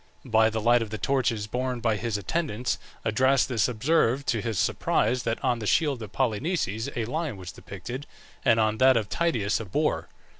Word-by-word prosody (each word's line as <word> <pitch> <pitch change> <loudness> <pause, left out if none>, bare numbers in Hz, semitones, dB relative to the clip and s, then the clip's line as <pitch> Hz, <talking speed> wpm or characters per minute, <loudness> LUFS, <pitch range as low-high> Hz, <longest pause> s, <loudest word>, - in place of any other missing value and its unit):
By 110 -2 +4
the 110 0 -2
light 120 +2 +4
of 115 - -3
the 110 - -4
torches 120 -6 0
borne 125 +3 -2
by 115 -2 +1
his 110 0 -2
attendants 125 - -2 0.3
Adrastus 125 0 +2
observed, 130 +2 +1
to 115 -3 +1
his 115 -3 -3
surprise, 120 +7 +1
that 115 -1 -1
on 120 -2 +1
the 105 - -4
shield 145 -4 +2
of 105 -3 -7
Polynices 125 - -1
a 115 - -1
lion 150 -1 -3
was 90 -2 -8
depicted, 120 +9 -8 0.4
and 115 - +4
on 110 0 +1
that 130 -1 +6
of 110 -2 -2
Tydeus 120 -12 0
a 115 - -5
boar. 95 - -1
115 Hz, 185 wpm, -26 LUFS, 110-130 Hz, 0.4 s, that